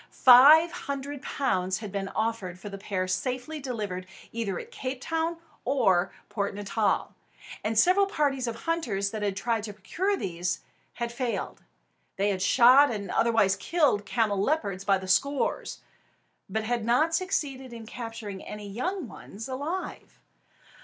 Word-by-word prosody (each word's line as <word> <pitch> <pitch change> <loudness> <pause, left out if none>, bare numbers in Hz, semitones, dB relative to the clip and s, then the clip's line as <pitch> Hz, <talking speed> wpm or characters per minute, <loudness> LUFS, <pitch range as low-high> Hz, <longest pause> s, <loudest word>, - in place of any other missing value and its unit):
Five 290 +7 +8
hundred 280 -4 -5
pounds 190 -8 0
had 210 -3 -7
been 195 -1 -3
offered 215 -5 -2
for 205 +3 -8
the 195 0 -8
pair 190 -2 -2
safely 255 +9 -2
delivered 210 -9 -4 0.2
either 215 -5 -2
at - - -8
Cape 260 0 -4
Town 325 +4 -1 0.3
or 195 -10 +2 0.2
Port 200 -2 -2
Natal; 205 +1 0 0.5
and 220 +1 -1
several 370 - +5
parties 280 -8 0
of 230 - -5
hunters 230 -13 -1
that 215 - -4
had 200 -2 -1
tried 230 -1 0
to 210 - -7
procure 365 - -1
these 175 - -2 0.3
had 235 -1 -3
failed. 240 -1 -3 0.5
They 200 +1 +1
had 190 -2 -3
shot 255 +8 +7
and 205 -3 -4
otherwise 225 -4 +3
killed 280 -12 +1
camelopards 205 -2 0
by 195 0 +3
the 190 0 -8
score, 275 +9 +1 0.9
but 220 +3 -1
had 235 0 -1
not 255 +9 +2
succeeded 285 -8 -1
in 230 -1 -9
capturing 225 -4 -7
any 210 -1 -7
young 325 - -3
ones 220 +1 -9
alive. 290 +8 -5
230 Hz, 145 wpm, -27 LUFS, 200-280 Hz, 0.9 s, Five